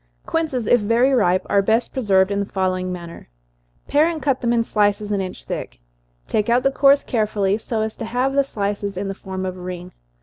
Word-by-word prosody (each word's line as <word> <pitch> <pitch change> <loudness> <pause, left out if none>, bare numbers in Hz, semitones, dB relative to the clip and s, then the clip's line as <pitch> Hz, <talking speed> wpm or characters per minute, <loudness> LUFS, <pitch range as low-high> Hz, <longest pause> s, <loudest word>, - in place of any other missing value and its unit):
_ - - -38
Quinces, 305 -8 -1
if 245 +2 +4
very 230 +6 +3
ripe, 185 -7 +2
are 200 - +3
best 225 +4 +1
preserved 195 -6 +2
in 200 - 0
the 200 - -1
following 185 -2 -1
manner: 170 - -8 0.6
Pare 295 +3 +4
and 335 -2 -2
cut 275 -3 0
them 235 -2 +1
in 235 -1 +2
slices, 210 -1 0
an 200 -1 0
inch 185 -1 -6
thick - - -6 0.5
take 210 +1 0
out 245 +2 +3
the 270 - +3
cores 275 +1 +4
carefully, 210 -4 0
so 225 0 -3
as 220 0 -3
to 225 - -6
have 250 +4 0
the 280 0 +3
slices 200 -5 -3
in 195 +1 -3
the - - -2
form 190 -1 -6
of 185 0 -4
a - - -10
ring. 180 0 -7
210 Hz, 225 wpm, -21 LUFS, 190-245 Hz, 0.6 s, if